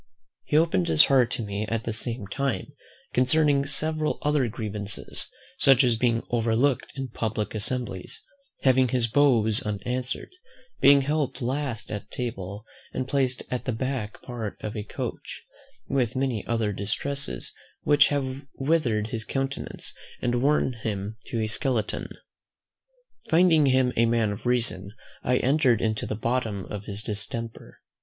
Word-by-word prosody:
He 150 - +2
opened 155 - +3
his 80 -2 +7
heart 130 -4 +4
to 115 - -2
me 105 +1 -3
at 115 0 -1
the 115 - -2
same 115 0 -3
time 135 +6 -2 0.4
concerning 140 +2 +3
several 155 +1 0
other 150 -4 +2
grievances, 105 -2 -2 0.3
such 135 -1 +6
as 120 -2 +3
being 115 0 +1
overlooked 120 +3 +1
in 135 -2 -4
public 110 -2 -2
assemblies, 110 -3 -2 0.4
having 130 -1 +5
his 125 -1 +1
bows 115 -4 +3
unanswered, 125 +4 -3 0.5
being 140 0 +7
helped 145 -1 -1
last 130 -2 -3
at 105 - -5
table, 105 -4 -5 0.3
and 130 0 -2
placed 135 -2 0
at 125 - -2
the 130 - 0
back 120 -2 -3
part 115 -5 -5
of 105 +1 -4
a 105 - -2
coach, 105 - -6 0.4
with 130 -5 0
many 130 -5 0
other 115 -3 0
distresses, 135 +9 -3 0.3
which 145 -1 +6
have 135 -2 -2
withered 135 -8 +1
his 110 -1 -3
countenance, 135 +3 -4 0.3
and 120 0 0
worn 140 -1 +2
him 110 -2 -4
to 115 - -2
a 110 - +1
skeleton. 110 0 0 1.2
Finding 165 -3 +5
him 130 -1 +3
a 115 +1 +4
man 115 -2 +2
of 100 +4 -5
reason, 105 -6 +2 0.3
I 125 0 +2
entered 130 -4 +3
into 110 -2 -1
the 110 - -2
bottom 110 -3 -1
of 105 -1 -5
his 100 +1 -4
distemper. 115 +2 -5
120 Hz, 145 wpm, -26 LUFS, 110-135 Hz, 1.2 s, his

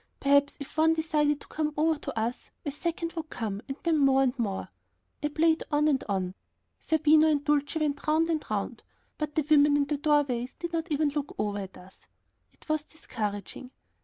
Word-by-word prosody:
Perhaps 280 +1 +3
if 285 +2 -9
one 320 +1 +4
decided 300 -2 +1
to - - -12
come 300 -1 -2
over 320 +1 +3
to - - -4
us, 230 +3 -3 0.2
a 290 - -1
second 335 +3 -3
would 325 -2 -5
come, 210 -3 -4 0.2
then 330 -2 +2
more 270 -1 +5
and 260 0 -1
more. 200 -5 -2 0.5
I 295 - +1
played 320 +2 +2
on 295 +1 +3
and 275 -3 +2
on, 185 -2 -1 0.5
Zerbino 315 0 +4
and 295 -2 +2
Dulcie 295 +1 +1
went 290 -1 -1
round 315 +2 +3
and 310 -2 -1
round, 215 +2 -3 0.4
but 300 -1 -3
the 310 -3 +1
women 295 -1 +5
in 285 - +2
the 290 +1 -1
doorways 280 -5 +1
did 340 0 -6
not 330 0 -2
even 300 0 +2
look 290 0 -4
over 205 0 -1
at 190 -1 -8
us. 185 +1 -17 0.4
It - - -23
was 310 -1 +1
discouraging. 215 - -6
295 Hz, 190 wpm, -28 LUFS, 255-310 Hz, 0.5 s, more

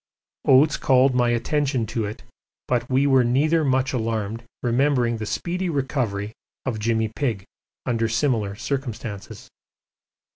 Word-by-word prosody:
Oates 145 +4 +5
called 130 0 +4
my 125 -1 +2
attention 130 +1 0
to 115 0 -2
it, 105 +1 -7 0.4
but 120 -1 0
we 135 +2 +3
were 135 -2 +5
neither 150 +7 +2
much 130 -1 +1
alarmed, 115 -2 -2 0.2
remembering 125 -1 +2
the 110 -1 -5
speedy 180 - -2
recovery 125 -8 -2 0.3
of 120 -5 -2
'Jimmy 110 0 0
Pigg' 115 -10 -2 0.4
under 115 -2 +1
similar 115 -5 0
circumstances. 120 -4 -5
125 Hz, 130 wpm, -23 LUFS, 115-135 Hz, 0.4 s, Oates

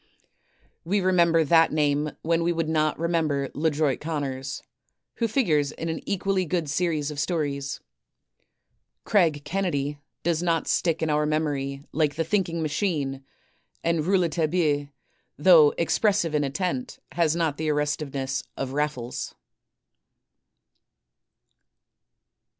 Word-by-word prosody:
We 195 +5 +1
remember 170 -3 +4
that 165 +1 +4
name 150 0 +1
when 165 +1 +1
we 170 +1 +1
would 165 -2 -1
not 155 -1 +1
remember 155 -5 0
"Ledroit 150 -2 +1
Conners" 140 -4 -4 0.5
who 230 - +1
figures 160 - +1
in 165 - -4
an 160 - -3
equally 195 -1 0
good 170 -2 -1
series 155 -3 0
of 145 - -6
stories. 145 -4 -2 1.2
"Craig 165 -8 +2
Kennedy" 145 -5 -1 0.2
does 170 -1 +1
not 165 -2 0
stick 165 -2 +1
in 160 - +1
our 150 0 +1
memory 140 -3 -1
like 150 -2 +1
the 165 - 0
"Thinking 170 -2 0
Machine," 145 -4 -1 0.6
and 165 -2 +1
"Rouletabille," 165 -4 +1 0.5
though 460 -3 +7
expressive 205 - +1
in 150 -1 +2
intent, 185 - -2
has 165 -2 +1
not 165 -4 0
the 155 0 -1
arrestiveness 145 -2 -1 0.2
of 135 -1 -3
"Raffles." 145 -5 -3
155 Hz, 115 wpm, -25 LUFS, 145-170 Hz, 1.2 s, though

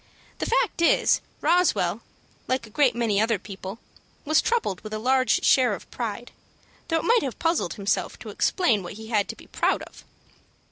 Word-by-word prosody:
The - - -2
fact 465 -7 +1
is, 335 - +4 0.2
Roswell, 360 +1 +2 0.5
like 255 -2 -1
a 215 - -15
great 270 0 +3
many 220 -4 +1
other 225 0 +2
people, 195 +1 -8 0.5
was 310 +1 +4
troubled 455 - -1
with 215 0 -6
a - - -2
large 255 +3 +2
share 250 -6 +4
of - - -14
pride, 235 0 -5 0.6
though 325 - +1
it 320 - -2
might 470 0 +4
have 265 -8 -4
puzzled 330 - 0
himself 200 +1 -1
to - - -9
explain 235 - +1
what 175 +1 -7
he 220 +1 -10
had 210 -3 +1
to - - -5
be - - -15
proud - - 0
of. - - -14
235 Hz, 185 wpm, -25 LUFS, 210-310 Hz, 0.6 s, is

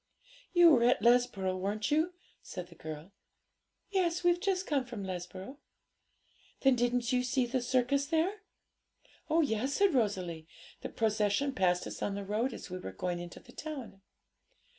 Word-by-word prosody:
'You 350 -2 +7
were 245 -5 +5
at 245 - +3
Lesborough, 235 -6 +3
weren't 205 +7 -2
you?' 320 +4 +2 0.3
said 180 -1 -7
the - - -13
girl. 155 +2 -8 0.8
'Yes; 360 -3 +1
we've 350 0 +4
just 380 -1 0
come 285 -5 +1
from 240 -5 -7
Lesborough.' 185 +7 -6 1.0
'Then 270 -2 +5
didn't 245 0 +1
you 250 - +3
see 250 0 +1
the 250 +1 -1
circus 260 +3 +1
there?' 335 +6 0 0.9
'Oh 325 +2 +4
yes,' 265 -1 0
said 400 -3 +3
Rosalie; 185 - -1 0.3
'the - - -5
procession 220 +5 +1
passed 180 -6 +2
us - - -7
on 200 - -1
the 200 0 -5
road 220 +6 0
as 195 - -9
we 185 - -4
were 95 - -6
going 175 - -3
into 175 0 -8
the - - -16
town.' 270 -10 -7
245 Hz, 160 wpm, -32 LUFS, 195-285 Hz, 1.0 s, You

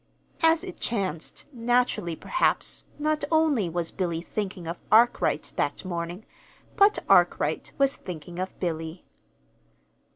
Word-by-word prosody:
As 325 +1 +4
it 370 -1 -8
chanced, 190 -8 -3
naturally, 235 -7 +1
perhaps, - - +1
not 305 0 0
only 310 - +2
was 170 0 -1
Billy 170 -3 -2
thinking 190 +1 -5
of 170 +1 -5
Arkwright 235 +3 +3
that - - -1
morning, 175 +2 -4 0.5
but 400 +1 +5
Arkwright - - +3
was 275 0 +3
thinking 175 0 -8
of 185 +1 -5
Billy. 165 -1 -4
195 Hz, 120 wpm, -26 LUFS, 170-275 Hz, 0.5 s, but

